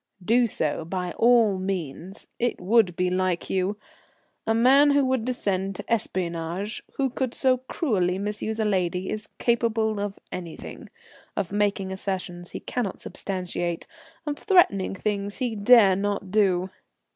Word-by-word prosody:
"Do 240 +3 +4
so 155 -8 -1
by 180 +1 -3
all 230 -4 +4
means. 185 -1 -4
It 240 0 0
would 190 -1 +3
be 180 0 0
like 185 -1 0
you. 190 +2 0 0.7
A 225 - +3
man 270 +5 +6
who 285 -1 +4
would 260 -3 0
descend 195 -6 -1
to - - -7
espionage, 180 0 -2
who 275 - +1
could 255 -1 -2
so 260 -1 +3
cruelly 215 - 0
misuse 210 +2 -3
a 220 - +1
lady, 185 -2 0
is 215 0 -4
capable 225 -3 +1
of 200 -1 -3
anything; 170 -3 -8 0.5
of 185 - -1
making 200 -2 0
assertions 185 -2 -4
he - - -6
cannot 230 -7 -3
substantiate, 175 -3 -3 0.4
of 295 -1 -3
threatening 345 - +3
things 200 0 -2
he 245 -4 -1
dare 205 -2 +6
not 200 -1 -2
do." 190 -3 +2
200 Hz, 145 wpm, -25 LUFS, 185-230 Hz, 0.7 s, man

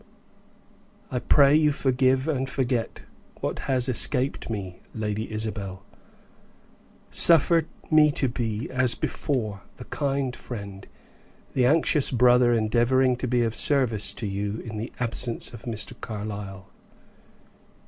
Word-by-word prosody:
"I 125 - -2
pray 140 +2 +4
you 155 -1 +3
forgive 130 0 0
and 135 -4 -2
forget 125 -3 -3 0.4
what - - -4
has 130 -1 +1
escaped 130 +2 +2
me, 95 -5 -6 0.2
Lady 110 0 -4
Isabel. 105 -3 -4 1.3
Suffer 165 -1 +6 0.2
me 155 -1 +5
to 135 - +1
be, 115 -2 -4
as 130 -2 +3
before, 110 -9 -3 0.2
the 125 - -10
kind 135 -3 -3
friend, 100 -5 -9 0.7
the 125 -2 +2
anxious 155 0 +3
brother 125 0 +3
endeavoring 120 +3 +1
to 125 - -4
be 120 0 +1
of 115 -1 -2
service 120 -6 +2
to 115 - -6
you 100 +2 -4
in 110 -2 -7
the 110 +2 -6
absence 120 0 -1
of 115 0 -12
Mr. 115 0 -3
Carlyle." 100 -3 -7
120 Hz, 125 wpm, -24 LUFS, 110-130 Hz, 1.3 s, Suffer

